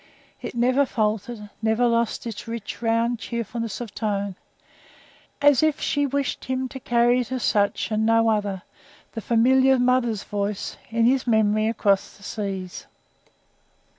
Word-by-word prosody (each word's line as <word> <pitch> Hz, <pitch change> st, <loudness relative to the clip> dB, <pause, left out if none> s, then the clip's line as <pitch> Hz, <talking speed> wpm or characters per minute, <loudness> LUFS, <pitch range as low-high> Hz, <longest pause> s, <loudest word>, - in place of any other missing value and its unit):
It -, -, -6 dB
never 255 Hz, +4 st, +3 dB
faltered 215 Hz, -1 st, -2 dB
never 220 Hz, +2 st, +2 dB
lost 235 Hz, -1 st, 0 dB
its 230 Hz, -2 st, -6 dB
rich, 230 Hz, -1 st, -6 dB
round, 230 Hz, +1 st, +1 dB
cheerfulness 230 Hz, -2 st, -4 dB
of 225 Hz, -4 st, -7 dB
tone; 200 Hz, -3 st, -2 dB, 1.1 s
as 290 Hz, -3 st, +6 dB
if 310 Hz, -1 st, +2 dB
she 285 Hz, -2 st, 0 dB
wished 275 Hz, -1 st, -2 dB
him 260 Hz, 0 st, -2 dB
to 265 Hz, -, -8 dB
carry 240 Hz, 0 st, +2 dB
it 245 Hz, 0 st, -4 dB
as 255 Hz, -2 st, -2 dB
such, 205 Hz, +1 st, +1 dB
and 215 Hz, 0 st, +1 dB
no 225 Hz, 0 st, +3 dB
other 205 Hz, -3 st, -2 dB, 0.5 s
the 225 Hz, -, -6 dB
familiar 260 Hz, +4 st, +4 dB
mother's 245 Hz, -4 st, +1 dB
voice 205 Hz, -1 st, -3 dB
in 230 Hz, +1 st, +1 dB
his 255 Hz, +1 st, +2 dB
memory 215 Hz, -1 st, +3 dB
across 205 Hz, -3 st, 0 dB
the 200 Hz, -, -18 dB
seas. 195 Hz, -4 st, -5 dB
230 Hz, 145 wpm, -24 LUFS, 210-245 Hz, 1.1 s, as